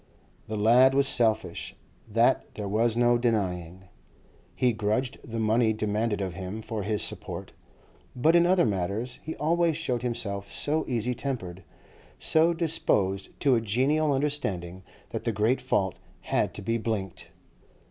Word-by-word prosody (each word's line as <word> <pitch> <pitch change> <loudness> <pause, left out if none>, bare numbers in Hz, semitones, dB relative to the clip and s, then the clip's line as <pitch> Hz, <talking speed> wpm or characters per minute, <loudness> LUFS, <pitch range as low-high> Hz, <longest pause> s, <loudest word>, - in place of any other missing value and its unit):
The 110 - -3
lad 125 +5 +5
was 140 0 +4
selfish, 110 -9 +1 0.3
that 115 +4 +1
there 105 -2 -4
was 110 +3 +1
no 120 0 +4
denying; 95 -6 -1 0.7
he 125 -2 +2
grudged 110 +5 -1
the 115 -3 -6
money 110 +1 +2
demanded 105 0 -1
of 95 -2 -3
him 95 +5 -6
for 110 -2 -4
his 105 +1 -1
support; - - -5 0.6
but 155 +7 +3
in 170 0 +5
other 185 -1 +4
matters 105 +5 -2
he 160 - -6
always 165 0 +1
showed 125 -8 -2
himself 100 -5 -3
so 155 +2 -1
easy 125 0 -1
tempered, 110 -9 -5 0.5
so 160 +2 +3
disposed 105 - 0
to 140 -2 +4
a 115 - +3
genial 135 +8 +1
understanding, 100 -11 -2 0.3
that - - -4
the 115 - 0
great 110 +4 +1
fault 95 -2 0 0.2
had - - -1
to 100 - -6
be 115 +3 0
blinked. 105 -5 -4
115 Hz, 145 wpm, -27 LUFS, 100-130 Hz, 0.7 s, lad